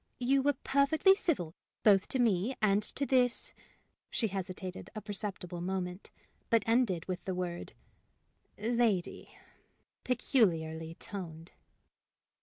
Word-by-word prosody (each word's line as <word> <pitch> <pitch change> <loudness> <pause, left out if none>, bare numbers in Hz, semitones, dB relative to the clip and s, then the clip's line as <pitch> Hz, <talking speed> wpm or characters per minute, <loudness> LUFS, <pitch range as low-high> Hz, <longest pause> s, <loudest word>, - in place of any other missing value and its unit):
You 265 +2 +2
were 290 +2 +3
perfectly 280 +7 +4
civil 265 - -1 0.3
both 195 -3 +5
to - - 0
me 230 0 +2
and 205 -1 +3
to 275 +6 +1
this 250 -3 +2 0.3
" - - -46
she 225 -4 0
hesitated 185 -1 -5
a 215 - -4
perceptible 195 -4 -4
moment, 180 0 -3 0.4
but 230 -2 +4
ended 225 -8 +2
with 185 -1 -4
the 190 - -2
word 175 -1 -4 0.8
"lady," 225 -4 0 0.7
peculiarly 165 -10 +1
toned. 170 -5 -7
200 Hz, 115 wpm, -32 LUFS, 180-245 Hz, 0.8 s, both